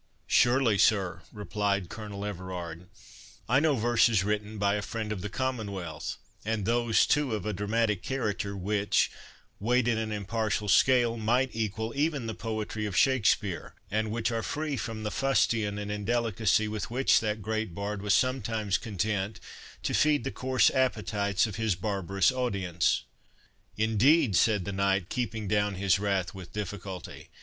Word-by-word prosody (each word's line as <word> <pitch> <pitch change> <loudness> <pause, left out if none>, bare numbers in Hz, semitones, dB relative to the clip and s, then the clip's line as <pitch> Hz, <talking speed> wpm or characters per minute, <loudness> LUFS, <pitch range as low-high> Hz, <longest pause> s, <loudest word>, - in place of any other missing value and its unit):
"Surely, 120 -4 +3
sir," 100 -5 +2
replied 100 -2 -1
Colonel 105 0 -7
Everard; 90 -3 -6 0.6
"I 130 +4 +4
know 150 -1 +3
verses 115 -3 +3
written 105 +1 -2
by 100 0 +2
a 105 - -1
friend 110 +1 -4
of 100 -4 -3
the 105 - -4
Commonwealth, 100 - -4 0.3
and 110 -2 -1
those, 120 0 +3
too, 145 -6 +1
of 105 - -5
a 105 - -1
dramatic 105 0 0
character, 105 -6 -2
which, 100 +2 +1 0.5
weighed 120 +3 +2
in 115 -2 +2
an 110 -1 -3
impartial 105 0 -2
scale, 120 +2 +4
might 120 +4 +1
equal 110 +1 -2
even 145 -3 0
the 110 - -3
poetry 110 -1 -3
of 95 -2 -3
Shakspeare, 105 -7 +2 0.2
and 110 +1 0
which 115 +2 -1
are 115 -1 -1
free 150 +5 -2
from 110 -2 -4
the 105 - -2
fustian 115 -6 +1
and 105 0 -4
indelicacy 110 0 +1
with 105 0 -4
which 130 +3 +3
that 105 -1 -2
great 110 -4 -2
bard 100 +1 -3
was 100 -2 +3
sometimes 110 -5 0
content 105 -1 -2 0.4
to - - -1
feed 150 -4 +3
the - - -3
coarse 130 +4 +2
appetites 105 -6 +1
of 105 -3 -5
his 110 -4 +1
barbarous 95 +1 +1
audience." 100 -9 0 0.7
"Indeed!" 115 - +3
said 105 -1 +3
the 100 - -3
knight, 95 -1 0
keeping 115 -4 -3
down 105 0 +1
his 95 0 +2
wrath 100 -3 -1
with 95 -3 -10
difficulty. 100 -3 -6
105 Hz, 155 wpm, -28 LUFS, 100-115 Hz, 0.7 s, I